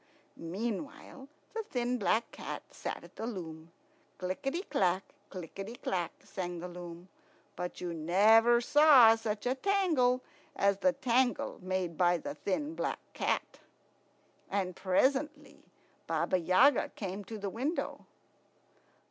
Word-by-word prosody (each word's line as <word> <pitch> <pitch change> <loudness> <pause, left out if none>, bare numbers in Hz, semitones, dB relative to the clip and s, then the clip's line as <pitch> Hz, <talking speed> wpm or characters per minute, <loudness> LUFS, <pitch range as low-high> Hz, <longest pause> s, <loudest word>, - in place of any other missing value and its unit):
Meanwhile 230 - -5 0.3
the 450 - -2
thin 250 - -2
black 225 +2 +1
cat - - -6
sat - - -5
at - - -16
the 225 - -4
loom. 165 -7 -7 0.5
Clickety 270 - -3
clack, 185 - +1 0.3
clickety 195 +5 -7
clack, 180 -8 -2
sang 180 -2 -5
the 175 +2 -6
loom; 175 0 -9 0.5
but 180 0 -5
you 175 -1 -3
never 220 +9 +5
saw 270 -4 +7
such 220 -1 -4
a 250 - +2
tangle 280 -7 +2 0.3
as 200 0 +2
the 275 +4 +3
tangle 255 -2 +1
made 185 -3 -2
by 175 -1 +4
the 150 - -6
thin 245 - -2
black - - -2
cat. - - -2 0.9
And 190 -2 -1
presently 275 +9 0 0.5
Baba 170 +3 +1
Yaga 185 - +4
came 195 0 -5
to 220 +3 -7
the 200 -2 -4
window. 275 - -3
205 Hz, 125 wpm, -31 LUFS, 180-255 Hz, 0.9 s, saw